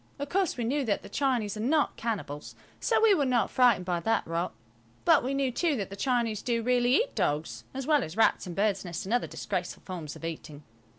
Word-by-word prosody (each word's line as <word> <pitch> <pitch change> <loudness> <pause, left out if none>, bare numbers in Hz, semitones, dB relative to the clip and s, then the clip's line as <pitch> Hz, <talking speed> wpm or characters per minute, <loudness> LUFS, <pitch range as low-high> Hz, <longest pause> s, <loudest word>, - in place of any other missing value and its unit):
Of 285 0 -5
course, 375 -6 0
we 240 - -1
knew 275 +5 0
that 205 -3 0
the - - -10
Chinese 245 -7 0
are - - -6
not 285 +7 +1
cannibals, 195 -11 -4 0.2
so - - +2
we 440 -2 +7
were 300 - +2
not 250 -3 +1
frightened 240 -8 +4
by 175 -2 0
that 225 +5 0
rot; 165 +2 -2 0.5
but - - +5
we 265 +2 -1
knew, 275 -2 +1
too, 315 +4 +1
that 200 -5 -4
the - - -5
Chinese 230 -2 0
do 235 -2 -1
really 245 +1 +3
eat - - +1
dogs, 150 +2 -1
as 270 0 -5
well 295 -3 +3
as 160 +6 -7
rats 225 - +3
and 175 - -6
birds' 200 -1 +1
nests 175 -2 -5
and 205 - -2
other 245 - +1
disgraceful - - -4
forms 170 -6 -6
of - - -8
eating. 150 -2 -7
230 Hz, 230 wpm, -28 LUFS, 185-265 Hz, 0.5 s, we